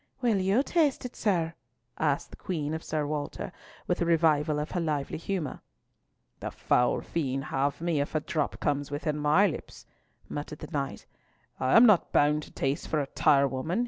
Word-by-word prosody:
"Will 235 -6 +2
you 195 +8 +3
taste 300 -5 +1
it, 250 - -6
sir?" 170 -6 0 0.5
asked - - 0
the - - -10
Queen 155 -5 -3
of 160 - -4
Sir 155 -1 -1
Walter, 145 0 -4 0.3
with - - -1
a - - +3
revival 155 -2 +3
of 150 +1 -3
her 180 - -1
lively 155 -3 -2
humour. 175 -3 -3 0.8
"The - - -4
foul 125 - +1
fiend 135 -4 -2
have 140 +1 0
me 165 -4 +1
if 145 - -4
a - - +4
drop 150 0 -2
comes 145 -2 -1
within 150 +1 -2
my 150 +7 +4
lips," 185 - -5 0.4
muttered 150 +1 -5
the - - -9
knight. 140 -3 -3 0.5
"I 130 - +2
am 235 - +9
not 210 -7 +4
bound 150 +1 +3
to - - -12
taste 135 +1 -2
for 155 - 0
a 145 - 0
tirewoman!" 140 - +2
155 Hz, 180 wpm, -28 LUFS, 145-175 Hz, 0.8 s, am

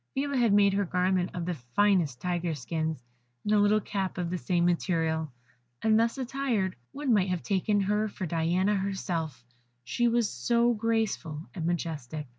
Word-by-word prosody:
Phila 280 +1 -1
had 240 -4 +3
made 200 -1 +5
her 200 +1 +2
garment 180 0 +1
of 175 -1 -3
the 180 - -1
finest 155 +1 +1
tigers' 175 -4 -2
skins, 160 -2 -3 0.4
and 210 - +1
a 210 - +5
little 205 +1 +4
cap 195 -2 -3
of 175 -1 -2
the 180 - -1
same 175 -1 +1
material; 160 -3 0 0.5
and 220 0 +4
thus 230 +3 +1
attired, 250 -7 -1 0.2
one 280 -3 0
might 195 -3 +3
have 180 -2 -2
taken 205 +1 +1
her 210 +2 +1
for 200 -2 -5
Diana 170 +5 +1
herself, 170 -9 -3 0.4
she 240 - +1
was 235 -1 +2
so 235 +3 +2
graceful 215 -8 -1
and 170 -4 -3
majestic. 155 -4 -3
190 Hz, 170 wpm, -28 LUFS, 165-215 Hz, 0.5 s, made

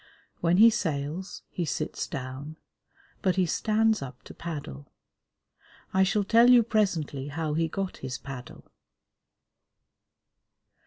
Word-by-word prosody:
When 170 +1 +2
he 225 +3 +8
sails, 160 -3 -3
he 175 - -3
sits 155 -1 -3
down, 135 +4 -6 0.6
but 185 -3 +2
he 185 -1 +3
stands 220 +5 +2
up 130 -2 -8
to - - -11
paddle. 145 - -7 1.0
I 190 - +3
shall 195 +2 +3
tell 230 +4 +5
you 245 -2 +8
presently 170 -11 0
how 155 +1 -2
he 165 +1 +1
got 195 +3 -4
his 130 -1 -5
paddle. 130 -3 -9
165 Hz, 120 wpm, -27 LUFS, 140-200 Hz, 1.0 s, he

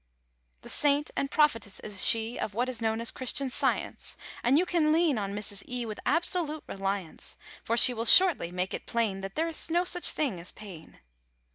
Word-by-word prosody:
The - - -10
Saint 290 0 +1
and 275 - -2
Prophetess 230 -11 +1
is 205 -3 +1
she 225 +1 +2
Of 205 - -4
what 245 +3 0
is 250 -3 -2
known 220 0 -1
as 230 - +1
Christian 260 +1 0
Science; - - -2 0.2
And 255 +4 +3
you 355 - +3
can 330 -4 +1
lean 315 -6 +2
on 200 0 -4
Mrs. 205 -1 -4
E. 250 -1 -3
With 215 -2 -7
absolute 330 -1 0
reliance; 195 -3 -5 0.3
For 230 - -1
she 250 - +6
will 230 -1 -4
shortly 340 - +5
make 180 +1 -3
it - - -6
plain 220 -5 -1
That 195 0 -7
there 325 +1 0
is 330 0 -3
no 345 +2 +2
such 355 0 +1
thing 260 - -2
as 170 - -7
pain. 190 -7 -13
235 Hz, 200 wpm, -28 LUFS, 205-305 Hz, 0.3 s, she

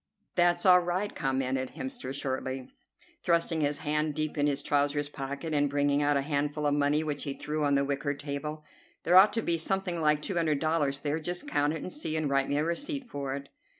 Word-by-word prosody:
"That's 175 -1 +3
all 180 -1 +8
right," 180 +4 -2
commented 130 -1 -1
Hemster 260 - -5
shortly, 130 -1 -3 0.5
thrusting 170 -2 +1
his 145 0 0
hand 150 0 0
deep 155 -1 -2
in 145 -1 +2
his 140 -1 -1
trousers 145 0 +1
pocket, 140 +3 -5
and 145 -1 +2
bringing 145 0 +2
out 145 0 +3
a 140 - 0
handful 145 +1 -1
of 145 - +3
money 145 +1 +2
which 150 -2 -3
he 140 -2 -4
threw 150 0 -3
on 140 -1 +3
the 140 0 +2
wicker 140 0 -1
table. 150 +2 -5 0.4
"There 175 - +3
ought 190 +3 +9
to 225 - -1
be 170 -1 0
something 180 -1 -1
like 150 -1 +2
two 190 - -2
hundred 155 -3 +2
dollars 150 -3 0
there. 150 +2 -1
Just 175 +3 -4
count 145 +1 +1
it 160 - -5
and 185 - -6
see, 160 - -3
and 155 -3 -1
write 135 0 +2
me 145 - +1
a 150 - +2
receipt 270 - -3
for 140 -1 -3
it." 140 0 -8
150 Hz, 220 wpm, -29 LUFS, 140-165 Hz, 0.5 s, ought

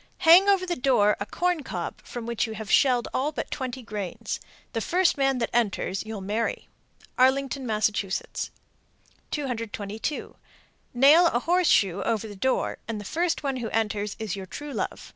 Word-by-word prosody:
Hang 360 +5 +8
over 390 -2 +3
the 355 - -1
door 245 -7 +3
a 200 - -4
corn 355 - 0
cob - - -5
from 240 -2 -7
which 235 -1 -1
you 220 - -5
have 215 -2 -6
shelled 250 -4 +4
all 285 +4 0
but 295 - -5
twenty 260 -1 -4
grains. 205 -5 -4 0.3
The 225 - -1
first 360 - +2
man 270 -1 +2
that 230 - -2
enters 205 -4 0
you'll 220 -2 -6
marry. 215 +4 -2 0.5
Arlington, 265 0 +2
Mass. 215 -1 +2 1.4
222. 230 -2 -4 0.6
Nail 295 +7 +7
a 240 -6 +1
horseshoe 280 - +3
over 225 +1 -1
the 205 - -9
door, 260 +7 0
and 225 -2 -3
the 205 - -8
first 335 - -1
one 270 -2 -1
who 235 -3 -3
enters 210 -2 -1
is 215 -4 -3
your 190 -1 -7
true 290 +8 -7
love. - - -4
240 Hz, 165 wpm, -26 LUFS, 215-285 Hz, 1.4 s, Hang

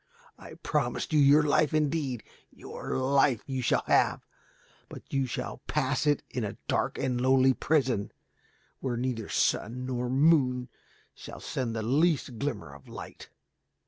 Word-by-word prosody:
I - - -12
promised - - -2
you 150 - +5
your 145 +2 +6
life 150 +1 +2
indeed. 150 -5 0 0.3
Your - - -6
life 135 -2 +2
you 130 -2 -3
shall 120 - +1
have, - - +2 0.6
but - - -12
you 135 -1 +1
shall 120 - -5
pass 145 0 0
it 145 -1 +2
in 125 - -2
a 105 +1 -4
dark - - 0
and 125 -2 -1
lonely 130 0 +4
prison, 130 -9 0 0.7
where 125 -3 -2
neither 120 -3 -3
sun 125 +4 0
nor 125 -1 -2
moon 130 -3 +3 0.4
shall - - -10
send 120 -3 -3
the 110 - -2
least 140 -1 +1
glimmer 115 - -4
of 70 -1 -15
light. - - -10
130 Hz, 145 wpm, -28 LUFS, 125-145 Hz, 0.7 s, your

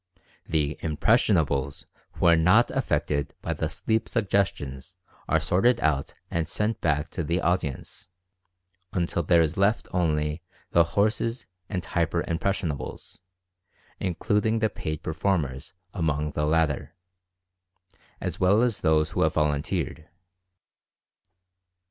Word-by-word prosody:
The 75 -3 0
"impressionables" 75 - +1 0.3
who - - -2
are 85 -1 +7
not 90 +9 +4
affected 70 -1 -1
by - - -1
the - - -2
sleep 110 0 -1
suggestions 90 - -1 0.3
are - - +3
sorted 120 +7 +2
out 75 -7 0 0.2
and 80 -2 -1
sent 105 +6 -1
back 75 0 0
to 85 - -3
the 85 +4 0
audience, 85 -2 -2 0.8
until 85 -1 0
there 85 0 +4
is 80 +1 -2
left 100 +4 +2
only 75 -2 0 0.3
the 85 - +6
"horses" 110 +3 +1 0.2
and 90 -3 -3
"hyper 85 0 0
impressionables" 85 -6 -3 0.8
including 105 +5 0
the 110 -1 +1
paid 75 -4 -5
perform 85 +1 0
ers 65 +2 -9 0.2
among 75 -4 -1
the 75 0 -1
latter, 80 -1 0 1.2
as - - -4
well 100 +5 +4
as 120 -4 0
those 80 -2 +2
who - - -1
have - - +2
vol 75 -1 +3
unteered. 80 +1 -3
85 Hz, 125 wpm, -26 LUFS, 75-100 Hz, 1.2 s, are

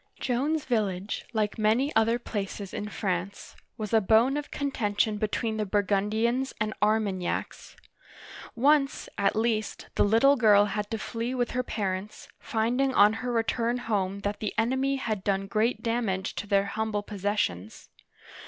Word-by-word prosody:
Joan's 280 +5 0
village, 205 -5 -1
like 215 -1 -1
many 230 +7 +2
other 225 +1 +3
places 205 -4 -5
in 210 - -4
France, 195 -1 -4 0.2
was 215 -1 -5
a 220 - +5
bone 225 +7 +4
of 295 0 -4
contention 215 -6 -1
between 220 +1 -1
the 215 - -1
Burgundians 210 +6 0
and 215 0 -1
Ar 215 +1 +4
magnacs. 190 -4 -4 0.8
Once, 275 +2 +2
at 200 0 +2
least, 220 -1 -1
the - - +3
little 230 +7 +5
girl 205 -4 +6
had 205 0 -3
to 225 - -2
flee 230 +3 -4
with 245 -1 -1
her 250 - 0
parents, 210 +3 -4
finding 250 +2 0
on 205 +1 +6
her 250 0 -2
return 235 +1 0
home 200 -4 -2
that 205 +1 -3
the 215 - -3
enemy 265 +4 +1
had 215 -7 -3
done 195 -1 0
great 215 +5 0
damage 225 -6 -1
to 205 - -5
their 200 -1 +3
humble 210 0 -2
possessions. 200 - -3
220 Hz, 155 wpm, -27 LUFS, 205-240 Hz, 0.8 s, girl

